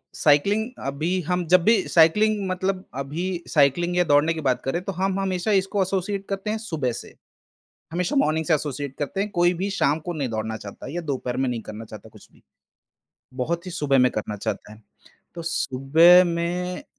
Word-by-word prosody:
Cycling 200 - +2 0.2
अभी 155 +7 -1
हम 180 -1 0
जब 180 +1 +5
भी 225 +1 +5
साइक्लिंग 205 +5 +4
मतलब 185 +1 -2 0.2
अभी 170 +5 -4
साइकलिंग 175 +5 +2
या 180 - +5
दौड़ने 145 +1 +3
की 160 - -5
बात 130 -4 0
करें, 170 +7 -1
तो 195 - -3
हम 190 +1 -1
हमेशा 190 +1 -1
इसको 195 0 +1
एसोसिएट 195 +1 -2
करते 195 +1 -3
हैं 220 - -1
सुबह 160 - -2
से। - - -9 0.8
हमेशा 180 - -1
मॉर्निंग 160 - +1
से 170 - +4
एसोसिएट 145 -2 -4
करते 150 +6 -3
हैं। 205 - -1
कोई 175 -2 +2
भी 190 +4 -3
शाम 150 -6 +1
को 175 - -1
नहीं 140 -5 -2
दौड़ना 110 0 -3
चाहता 105 +4 -10
या 175 - -3
दोपहर 130 -4 -3
में 130 0 0
नहीं 120 -2 -2
करना 110 +2 -8
चाहता - - -12
कुछ - - -18
भी। - - -24 1.0
बहुत 170 +4 -3
ही 180 - -6
सुबह 145 -5 +1
में 125 0 +4
करना 105 0 -4
चाहता 105 - -5
है। 110 - -17 0.5
तो 170 - -5
सुबह 165 +4 +5
में 175 +1 -2
170 Hz, 190 wpm, -24 LUFS, 140-185 Hz, 1.0 s, जब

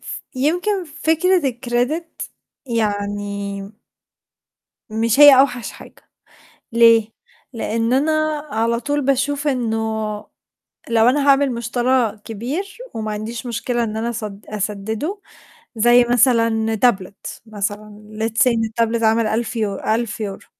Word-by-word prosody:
ف - - -7
يمكن 355 +8 0
فكرة 320 +4 +1
الcredit 245 +6 -1 0.6
يعني 205 -3 -2 1.3
مش 225 +4 +1
هي 290 -3 +10
أوحش 245 -4 0
حاجة، - - -15 0.7
ليه؟ 230 -1 +5 0.4
لإن 230 0 -1
أنا 295 +4 +2 0.4
على 230 +1 0
طول 290 +4 -1
باشوف 280 +2 0
إنه 240 -5 0 1.1
لو 230 +1 +4
أنا 285 +2 +2
هاعمل 275 -1 +4
مُشترى 240 -1 0
كبير 265 - -5 0.2
وما 215 -1 -3
عنديش 225 +3 -5
مشكلة 240 +1 -1
إن 215 0 -4
أنا 230 +2 -2
أسد 210 -3 -7
أسدده 215 - -3 0.6
زي 240 +2 +5
مثلًا 230 -2 +3
تابلت 205 -4 -1
مثلًا 210 0 -6
let's 225 0 -1
say - - +4
إن 225 -1 0
التابلت 230 +1 -1
عامل 225 +1 +3
1000 230 +2 -2
يو 210 -3 -1
1000€، 215 -3 -3
230 Hz, 115 wpm, -20 LUFS, 215-255 Hz, 1.3 s, هي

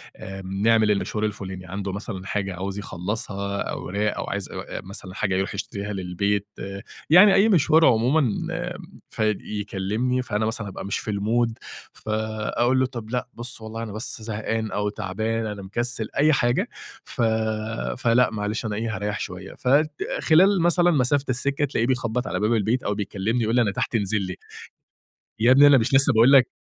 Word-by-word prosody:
آآ 95 0 -8
نعمل 105 +3 +2
المشوار 105 +1 -1
الفلاني، 95 -3 -5
عنده 95 +2 -4
مثلًا 100 -1 -6
حاجة 100 -1 -2
عاوز 95 +2 -4
يخلصها، 100 +1 -3
أوراق 105 +3 -2
أو - - -2
عايز 100 -1 -3 0.3
مثلًا 95 -1 -6
حاجة 95 -2 0
يروح 95 +1 -1
يشتريها 100 0 -4
للبيت، 100 +2 -1 0.6
يعني 190 +5 +8
أي 205 +4 +5
مشوار 160 -3 +5
عمومًا. 125 +6 +4 0.9
فيكلمني، 105 +3 -1
فأنا 110 -3 -1
مثلًا 110 -2 -3
أبقى 95 - -7
مش 100 - -2
في 110 - -4
المود 115 +3 0 0.4
فأقول 110 +3 -1
له 130 - +3
"طب 120 -4 -7
لأ، 125 +1 -2
بُص 120 0 -8
والله 110 +1 -6
أنا 110 - -6
بس 110 +1 -5
زهقان 110 0 -3
أو 105 0 -1
تعبان. 110 +3 -2
أنا 105 -2 -5
مكسل." 115 +3 -3
أي 155 +2 +4
حاجة 120 -2 +1 0.3
ف - - -6 0.8
فلأ 125 0 +3
معلش 105 +2 -3
أنا 105 -2 -2
إيه، 110 0 -2
هاريح 105 +2 -3
شوية. 95 +1 -7
فخلال 155 +6 +3
مثلًا 175 +1 +4
مسافة 140 -1 +2
السكة، 140 +3 +1
تلاقيه 120 -4 -1
بيخبط 125 -1 -1
على - - -2
باب 105 +2 +2
البيت 115 +3 +1
أو 105 - 0
بيكلمني 105 +3 -1
يقول 110 +2 0
لي 125 - +5
أنا 105 -4 +1
تحت 100 - -2
انزل 105 -1 +1
لي. 90 -1 -4 1.1
يا 115 +3 +5
ابني 140 +2 +7
أنا 145 -2 +7
مش 120 +3 0
لسه 135 +1 +6
باقول 115 +4 +6
لك 135 -3 +7
110 Hz, 165 wpm, -24 LUFS, 100-125 Hz, 1.1 s, يعني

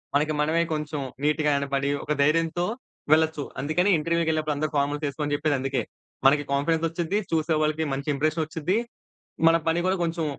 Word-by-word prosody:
మనకి 150 +2 +2
మనమే 160 +3 +2
కొంచెం 150 -1 -3 0.2
నీట్‌గా 150 0 +2
కనపడి 140 0 -1
ఒక - - -5
ధైర్యంతో 165 +3 +2 0.5
వెళ్లొచ్చు. 160 -1 +2 0.2
అందుకని 165 +7 +1
ఇంటర్వ్యూ‌కెళ్ళినప్పుడు 160 -1 0
అందరూ 155 +1 -2
ఫార్మల్స్ 145 +2 0
ఏసుకో 145 +2 -5
అని 145 - -2
జెప్పేది 145 -1 0
అందుకే. 135 0 -1 0.5
మనకి 145 +1 +3
కాన్ఫిడెన్స్ 160 +4 +1
ఒచ్చిద్ది. 170 +4 -1
చూసే 160 0 +1
వాళ్ళకి 155 +1 0
మంచి 140 +2 -4
ఇంప్రెషన్ 155 +3 0
ఒచ్చి‌ద్ది. 165 +5 -1 0.7
మన 165 - +4
పని 165 +1 +1
గూడా 190 +1 +1
కొంచెం 165 -1 -2
155 Hz, 160 wpm, -25 LUFS, 145-165 Hz, 0.7 s, మన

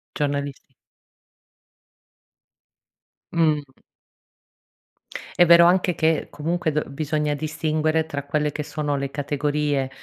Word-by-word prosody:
Giornalisti. 140 -1 -3 2.6
Mh. 155 -3 +2 1.8
È 175 - +8
vero 170 0 +8
anche 180 0 +3
che, 160 -1 +1
comunque, 160 +1 -2
d 150 - 0
b - - -15
bisogna 150 +1 -1
distinguere 155 +1 -1
tra 145 -3 -5
quelle 150 +1 0
che 150 +1 -5
sono 150 -2 -2
le 140 0 -4
categorie, 145 -1 -1
150 Hz, 100 wpm, -23 LUFS, 145-160 Hz, 2.6 s, È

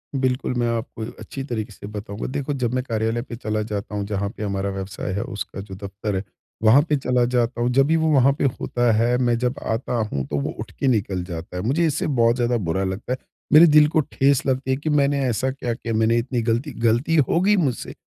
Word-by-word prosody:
बिल्कुल, 130 -1 0
मैं 120 -1 0
आपको 110 0 -6
अच्छी 135 - -6
तरीक़े 115 -4 -4
से 100 - -10
बताऊँगा। 105 0 -6
देखो 140 +1 -2
जब 125 -3 -1
मैं 130 0 0
कार्यालय 115 -1 -1
पे 120 -1 -8
चला 110 -2 -2
जाता 105 -1 -4
हूँ 100 -1 -2
जहाँ 100 -1 -2
पे - - -4
हमारा 100 -1 -1
व्यवसाय 95 -1 -5
है, 100 - -1
उसका 100 -2 -6
जो 95 -1 -9
दफ़्तर 100 +1 -4
है 95 - -2 0.4
वहाँ 115 +6 +7
पे 150 - +3
चला 125 -2 +1
जाता 120 0 0
हूँ, 120 - +2
जब 135 +2 +4
भी 160 - +3
वो 160 0 +2
वहाँ 135 -2 +5
पे - - -3 0.2
होता 120 -1 +1
है 120 +2 +2
मैं 120 -2 +2
जब 125 +1 0
आता 115 +3 -2 0.2
हूँ 70 -1 -1
तो 75 - -2
वो - - -2
उठ - - -6
के 140 - +1
निकल 100 -7 +1
जाता 85 0 -7
है। - - -2
मुझे 145 +9 +2
इससे 155 -2 0
बहुत 120 -5 +3
ज़्यादा 120 -1 +1
बुरा 95 -2 -1
लगता 95 +6 -3
है। - - -3 0.4
मेरे 155 +3 +10
दिल 150 -1 +6
को 155 - +1
ठेस 140 -1 +1
लगती 130 -1 0
है 130 - +1
कि 150 +3 -3
मैंने 145 -1 +2
ऐसा 125 +2 0
क्या 125 -3 -3
किया 115 -1 -4
मैंने 110 +1 +3
इतनी 120 +1 -1
गलती 120 +6 -1
गलती 120 +8 +2
हो 155 +2 +3
गई 205 +3 +4
मुझसे 140 -10 -1
120 Hz, 240 wpm, -23 LUFS, 105-135 Hz, 0.4 s, मेरे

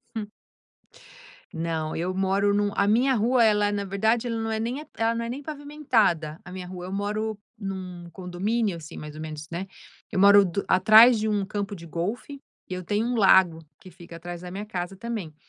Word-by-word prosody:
Hum. 210 -2 -4 1.2
Não 160 -1 -3
eu 175 +3 -2
moro 195 +2 +1
num 205 0 +1
a 200 - +2
minha 245 +6 +3
rua 235 +3 +3
ela 210 -2 +3
na 205 -1 -2
verdade 220 +5 +1
ela 230 - -2
não 225 0 -2
é 220 - -1
nem 245 +6 -3
ela 225 +1 +1
não 230 - -2
é - - -5
nem 260 +4 -5
pavimentada 260 - 0
a 180 - -11
minha 180 -1 -7
rua, 180 -1 -7
eu 185 - -7
moro 210 +2 -2 0.2
num 185 -4 -6
condomínio, 195 +4 -2
assim, 160 -2 -10
mais 150 0 -8
ou 155 - -8
menos, 155 -1 -7
né. 175 +3 -4 0.5
Eu - - -1
moro 200 +1 +8
do 190 +1 -2
atrás 220 +6 +7
de 215 - -1 0.2
campo 205 +1 -3
de 170 -2 -11
golfe 210 - -4 0.3
e - - -4
eu 185 0 -5
tenho 210 +5 0
um 245 - -1
lago 190 -5 +5 0.2
que 185 - -13
fica 170 -1 -12
atrás 175 +1 -8
da 180 0 -8
minha 200 +3 -5
casa 180 -2 -5
também 215 -7 -5
200 Hz, 200 wpm, -25 LUFS, 175-220 Hz, 1.2 s, moro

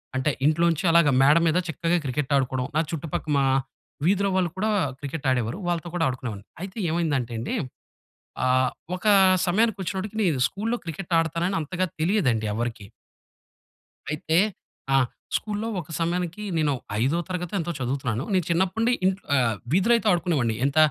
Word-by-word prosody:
అంటే 130 +3 +1
ఇంట్లోంచి 165 +2 +2
అలాగ 170 -2 +5
మేడ 145 +4 +6
మీద 160 - +2
చక్కగా 165 +3 0
క్రికెట్ 140 +2 -2
ఆడుకోవడం. 130 -1 -1
నా 155 - +4
చుట్టుపక్క 160 -1 -4
మా 135 - +3 0.6
వీధిలో 200 +2 +3
వాళ్ళు 185 -2 +2
కూడా 215 +3 0 0.3
క్రికెట్ 145 +1 -6
ఆడేవారు. 125 +3 0
వాళ్ళతో 175 0 -1
కూడా 165 - +1
ఆడుకునేవాడిని. 120 -6 -5 0.2
అయితే 190 +3 -7
ఏమైందంటే 145 -8 0
అండి, 115 - -3 0.9
ఆహ్, 130 0 +3 0.3
ఒక 215 - -8 0.4
సమయానికొచ్చినప్పటికి 200 0 0
నేను 150 -8 +1
స్కూలులో 225 +4 -2
క్రికెట్ 170 +2 -6
ఆడతానని 165 +3 -1
అంతగా 185 +5 -1
తెలియదండి 155 - +1
ఎవరికీ. 115 -2 -3 1.3
అయితే 160 +2 0 0.6
ఆ! - - +6 0.4
స్కూలులో 210 +1 -2
ఒక 165 -2 -9
సమయానికి 175 +3 -2
నేను 150 -3 +2 0.3
5 140 +8 +2
తరగతి 180 -1 -4
ఎంతో 170 +1 -2
చదువుతున్నాను. 130 -1 -2
నేను 185 -2 +3
చిన్నప్పటి 185 +5 +1
నుండి 240 +2 +3
ఇంట్లో 190 +1 0
ఆహ్, 120 -5 +2 0.2
వీధిలో 195 +7 +4
అయితే 225 - 0
ఆడుకునేవాడిని. 155 -10 +1
ఎంత 140 +2 -1
165 Hz, 145 wpm, -25 LUFS, 135-185 Hz, 1.3 s, మేడ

